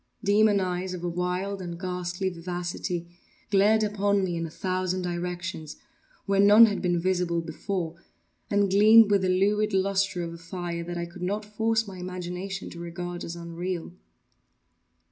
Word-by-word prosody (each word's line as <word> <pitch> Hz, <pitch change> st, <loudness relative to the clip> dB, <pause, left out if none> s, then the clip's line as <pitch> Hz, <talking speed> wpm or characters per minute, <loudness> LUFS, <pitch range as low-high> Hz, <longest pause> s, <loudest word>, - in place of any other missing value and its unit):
Demon 205 Hz, 0 st, +4 dB
eyes, 185 Hz, 0 st, -2 dB
of 175 Hz, -, -8 dB
a -, -, -1 dB
wild 180 Hz, +3 st, -2 dB
and 170 Hz, -2 st, -6 dB
ghastly 180 Hz, 0 st, -3 dB
vivacity, 175 Hz, 0 st, -4 dB, 0.5 s
glared 210 Hz, +2 st, +4 dB
upon 205 Hz, -1 st, +1 dB
me 175 Hz, -2 st, -1 dB
in 165 Hz, 0 st, -2 dB
a -, -, -9 dB
thousand 185 Hz, +2 st, -2 dB
directions, 175 Hz, -3 st, -4 dB, 0.5 s
where 195 Hz, 0 st, +1 dB
none 205 Hz, +3 st, +9 dB
had 205 Hz, -3 st, -1 dB
been 175 Hz, -2 st, +1 dB
visible 180 Hz, -1 st, 0 dB
before, 165 Hz, +1 st, -4 dB, 0.5 s
and 205 Hz, -1 st, +2 dB
gleamed 215 Hz, +2 st, +7 dB
with 200 Hz, -1 st, +4 dB
the 185 Hz, -, +1 dB
lurid 205 Hz, +3 st, +2 dB
lustre 195 Hz, -1 st, +1 dB
of 165 Hz, 0 st, -5 dB
a 170 Hz, -, -10 dB
fire 170 Hz, 0 st, -5 dB
that 175 Hz, +1 st, -5 dB
I 170 Hz, -, -2 dB
could 170 Hz, +1 st, -12 dB
not 205 Hz, +4 st, -2 dB
force 220 Hz, +1 st, 0 dB
my 190 Hz, -2 st, -8 dB
imagination 180 Hz, +2 st, -5 dB
to 170 Hz, -, -9 dB
regard 175 Hz, +1 st, -5 dB
as 170 Hz, -, -5 dB
unreal. 170 Hz, +1 st, -5 dB
185 Hz, 165 wpm, -27 LUFS, 175-200 Hz, 0.5 s, none